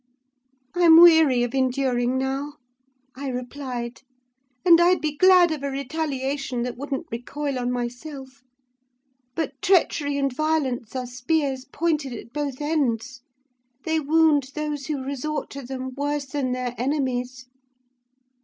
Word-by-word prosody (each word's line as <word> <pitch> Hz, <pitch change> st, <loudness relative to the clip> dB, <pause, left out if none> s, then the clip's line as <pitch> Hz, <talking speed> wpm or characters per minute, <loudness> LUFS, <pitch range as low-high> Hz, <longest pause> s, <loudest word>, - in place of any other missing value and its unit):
"'I'm 335 Hz, -2 st, +7 dB
weary 320 Hz, -8 st, +7 dB
of 245 Hz, -, -3 dB
enduring 255 Hz, -1 st, +1 dB
now,' 270 Hz, +2 st, -2 dB, 0.6 s
I 275 Hz, +2 st, -6 dB
replied; 250 Hz, -1 st, -5 dB, 0.6 s
'and 340 Hz, -1 st, +7 dB
I'd 355 Hz, 0 st, +4 dB
be 300 Hz, -1 st, -2 dB
glad 365 Hz, +1 st, +6 dB
of 305 Hz, -3 st, -3 dB
a 280 Hz, -, -2 dB
retaliation 275 Hz, -2 st, -3 dB
that 245 Hz, 0 st, -4 dB
wouldn't 280 Hz, +4 st, -4 dB
recoil 270 Hz, +3 st, -4 dB
on 245 Hz, 0 st, -1 dB
myself; 260 Hz, +2 st, -6 dB, 0.9 s
but 280 Hz, -4 st, -4 dB
treachery 310 Hz, -6 st, +2 dB
and 275 Hz, -2 st, 0 dB
violence 270 Hz, -6 st, -1 dB
are 255 Hz, -1 st, -2 dB
spears 260 Hz, +2 st, -1 dB
pointed 295 Hz, -2 st, -1 dB
at 235 Hz, 0 st, -10 dB
both 290 Hz, -2 st, -3 dB
ends; 260 Hz, -5 st, -1 dB, 0.6 s
they 320 Hz, 0 st, +1 dB
wound 305 Hz, -2 st, +3 dB
those 300 Hz, -2 st, -3 dB
who 290 Hz, -4 st, -3 dB
resort 280 Hz, +3 st, -4 dB
to 280 Hz, -, -7 dB
them 260 Hz, 0 st, -6 dB
worse 290 Hz, 0 st, -2 dB
than 270 Hz, -1 st, -2 dB
their 250 Hz, -1 st, -2 dB
enemies. 255 Hz, -2 st, -2 dB
275 Hz, 130 wpm, -24 LUFS, 255-305 Hz, 0.9 s, I'm